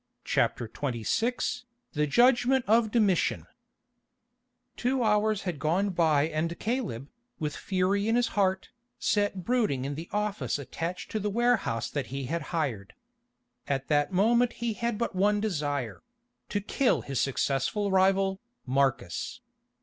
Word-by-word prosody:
CHAPTER 120 - 0
XXVI 150 - -2 0.3
THE 150 0 +1
JUDGMENT 250 - +4
OF 225 +1 +4
DOMITIAN 205 -6 +2 1.3
Two 255 +1 0
hours 215 -1 +2
had 175 -6 -3
gone 180 +7 +1
by 160 -5 +3
and 160 +2 -2
Caleb, 215 - -3 0.3
with 150 -1 -3
fury 195 +2 0
in 225 - +2
his 240 -1 +2
heart, 190 -2 0 0.3
sat 205 -3 0
brooding 210 - +1
in 140 - -3
the 160 +4 -7
office 210 -4 -1
attached 165 +5 -5
to 215 - -1
the 210 0 -1
warehouse 230 - +1
that 145 -2 -3
he 135 +1 -4
had 165 +6 -2
hired. 130 - -3 0.7
At 135 -1 -2
that 145 +2 +2
moment 235 +6 +3
he 235 -1 -2
had 235 0 -2
but 235 - -2
one 205 +2 +3
desire—to 205 - -4
kill 250 +5 +1
his 135 -3 -2
successful 140 - 0
rival, 190 0 +3 0.2
Marcus. 135 -8 -1
190 Hz, 135 wpm, -28 LUFS, 145-225 Hz, 1.3 s, JUDGMENT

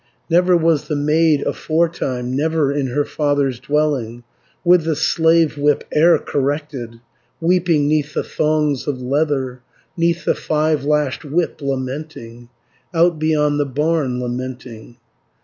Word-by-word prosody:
Never 180 +1 +4
was 165 -3 +1
the 150 - -2
maid 150 0 +2
aforetime, 140 -6 -1
Never 155 0 +1
in 140 -2 -1
her 145 +4 -1
father's 145 -4 0
dwelling, 130 -5 -1 0.4
With 175 -1 +5
the 160 -1 -1
slave 160 0 +2
whip 145 0 +2
e'er 165 +3 +5
corrected, 140 -4 -3 0.4
Weeping 170 -3 +2
'neath 150 0 0
the - - 0
thongs 150 -3 0
of 140 -3 -2
leather, 130 -1 -1 0.3
'Neath 170 0 0
the - - +3
five 155 -2 -1
lashed 150 -2 0
whip 160 +2 -2
lamenting, 130 -3 -5 0.5
Out 170 -1 +3
beyond 150 -2 +1
the 145 - +1
barn 145 -2 -1
lamenting. 125 -2 -6
150 Hz, 130 wpm, -19 LUFS, 130-160 Hz, 0.5 s, With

